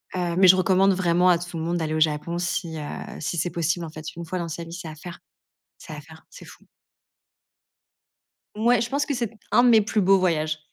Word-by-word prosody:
Heu, 175 -2 -2
mais 190 -1 +6
je 185 - +8
recommande 190 +1 +3
vraiment 180 0 +2
à 175 - +5
tout 175 -1 -7
le 160 - -4
monde 170 +1 -1
d'aller 155 -1 -2
au - - 0
Japon 155 +2 0
si, 170 -2 -3
heu, - - -5 0.4
si 170 +2 -4
c'est 175 +2 -1
possible 170 +1 -2
en - - -8
fait, 155 0 -9
1 170 - -7
fois 180 +2 -4
dans 170 - -4
sa 170 +1 -6
vie, 165 0 -10
c'est 175 -2 -7
à 155 - -8
faire, 170 +2 -10 0.6
c'est - - -11
à 150 - -7
faire, 160 +1 -16
c'est - - -13
fou. - - -16 1.9
Ouais, 235 +1 +2
je 235 - -2
pense 285 +3 0
que 285 - -2
c'est 235 -4 -3 0.2
un 245 - +5
de 245 - +5
mes 220 -2 +6
plus 210 0 -1
beaux 195 +1 +4
voyages. 155 -3 0
175 Hz, 240 wpm, -24 LUFS, 160-190 Hz, 1.9 s, je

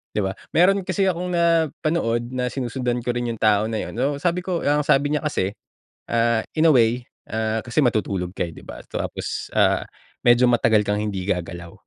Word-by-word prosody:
'di 105 - +1
ba? 95 - -1 0.2
Meron 190 +2 +4
kasi 190 +1 0
akong 180 0 -2
napanood 160 -7 +1
na 125 -1 -1
sinusundan 125 -1 -2
ko 120 - 0
rin 120 0 -2
yung 115 - -11
tao 110 -1 +3
na 110 -1 -2
yun, - - -7
uh, 140 +4 +1
sabi 175 +2 +1
ko 180 -3 -2
ang 145 0 +2
sabi 145 +1 +3
niya 150 - 0
kasi 100 -10 0 0.6
ah, 115 -1 +2
in 160 +1 +5
a - - +7
way 120 +1 +2 0.2
ah 110 0 -1
kasi 120 +5 -1
matutulog 100 -7 0
ka - - 0
eh 85 - -9
di - - -12
ba - - -10
tapos - - -4
ah - - +3 0.4
medyo 120 +1 +6
matagal 115 -3 +3
kang 105 +1 0
hindi 100 -3 -3
gagalaw. 85 -2 -4
120 Hz, 195 wpm, -22 LUFS, 110-150 Hz, 0.6 s, a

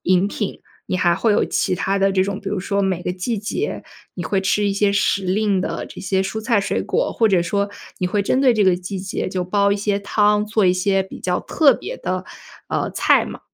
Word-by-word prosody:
饮 185 +1 +3
品， 205 0 -4 0.3
你 - - -1
还 175 -2 +3
会 215 +5 +2
有 - - +3
其 185 - 0
他 195 +2 -1
的 195 0 +3
这 190 -1 +2
种， 200 0 -4
比 195 - -5
如 200 0 -2
说 200 +2 -1
每 190 -3 0
个 180 - -2
季 185 +6 -3
节 215 - -3 0.3
你 175 - -5
会 195 +3 0
吃 205 +2 +1
一 200 - +1
些 200 0 +2
时 200 -1 +1
令 200 +1 +1
的 - - -3
这 - - -10
些 190 0 0
蔬 205 +3 -4
菜 230 0 +1
水 200 - -1
果， - - -1
或 225 - +2
者 185 -4 +3
说， 200 +4 -1 0.3
你 180 - 0
会 200 +3 0
针 255 +6 +1
对 260 -3 +4
这 210 -2 +3
个 185 -1 +5
季 185 +2 -6
节 185 0 -3
就 185 -1 -2
煲 200 +2 +2
一 - - 0
些 205 0 0
汤， 210 +1 +2
做 215 -1 +1
一 180 - +5
些 195 +1 +1
比 190 - -11
较 180 -1 0
特 295 -4 +4
别 - - -7
的， - - -3 0.4
呃， - - -1
菜 - - +3
吗？ - - -8
200 Hz, 260 characters per minute, -20 LUFS, 185-210 Hz, 0.4 s, 个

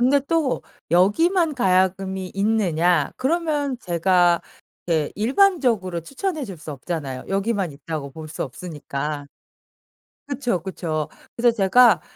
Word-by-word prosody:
근데 270 +3 +4
또 320 -6 +1 0.3
여기만 315 - +3
가야금이 190 -3 +1
있느냐? 180 -5 +2
그러면 290 -2 0
제가 175 -2 +3 0.5
게 160 -4 +1
일반적으로 235 - +2
추천해 300 - -3
줄 195 -7 -8
수 155 - -8
없잖아요. 140 -2 -5
여기만 195 -3 0
있다고 140 0 -6
볼 155 +2 -9
수 160 - -4
없으니까. 145 0 -5 1.0
그쵸, 245 - -1
그쵸. 160 -4 -3 0.3
그래서 235 -1 +3
제가 225 +3 +5
190 Hz, 265 characters per minute, -23 LUFS, 165-250 Hz, 1.0 s, 제가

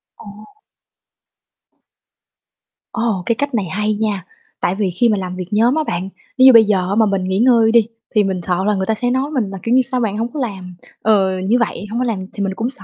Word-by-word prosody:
Ồ. - - -15 2.7
Ồ, 225 -6 -2
cái 230 - +1
cách 285 +1 -3
này 205 -4 0
hay 210 +5 -2
nha! 210 -2 -2 0.3
Tại 180 - -1
vì 200 -2 -1
khi 240 -1 +4
mà 210 - +1
làm 185 -1 -5
việc 180 -1 -6
nhóm 230 +6 +3
á 315 - +1
bạn, 185 - -4 0.3
nếu 260 - +6
như 260 - +9
bây 225 -1 +8
giờ 185 -3 0
á 200 - 0
mà 225 - +4
mình 195 -2 -1
nghỉ 190 +1 -1
ngơi 230 -2 +4
đi 230 -2 +4 0.3
thì 210 - +4
mình 190 -2 -2
sợ 180 +1 -1
là 210 -1 +1
người 190 0 -2
ta 220 - 0
sẽ 245 +3 0
nói 265 +4 -1
mình 240 -9 -1
là, 195 - -7
kiểu 235 +2 +1
như: 260 - +5
"Sao 255 0 0
bạn 210 -2 -1
hổng 235 +2 -3
có 300 - -4
làm?" 190 -8 -5 0.3
Ờ, 195 -3 +2
như 210 +7 +1
vậy. 220 -2 -2
Hông 230 +3 -3
có 255 - 0
làm 225 -5 -2
thì 200 - -3
mình 190 -1 -2
cũng 230 +5 -3
sợ 275 - -2
215 Hz, 250 wpm, -18 LUFS, 190-235 Hz, 2.7 s, như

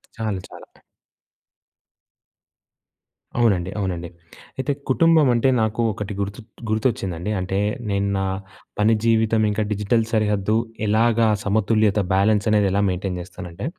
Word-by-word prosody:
చాలా 110 -4 -3
చాలా. - - -11 2.8
అవునండి. 95 -6 +2
అవునండి. 90 -4 -3 0.5
అయితే 130 +2 -1 0.2
కుటుంబం 160 +1 +4
అంటే 120 +3 +2
నాకు 110 +2 0
ఒకటి 105 0 -5
గుర్తు 100 +3 -4 0.3
గుర్తొచ్చిందండి. 105 -4 -1
అంటే 95 +1 -2 0.3
నేను 100 0 0
నా 95 - 0 0.5
పని 110 +2 +4
జీవితం 110 -1 +3
ఇంకా 105 +1 0
డిజిటల్ 105 +3 +1
సరిహద్దు 105 -1 +1 0.3
ఎలాగా 115 +1 +3 0.2
సమతుల్యత 105 0 +2
బ్యాలెన్స్ 100 +2 +2
అనేది 105 -2 +3
ఎలా 100 +1 +1
మెయింటెయిన్ 90 0 -3
జేస్తానంటే, 90 +3 -8
105 Hz, 115 wpm, -22 LUFS, 95-110 Hz, 2.8 s, కుటుంబం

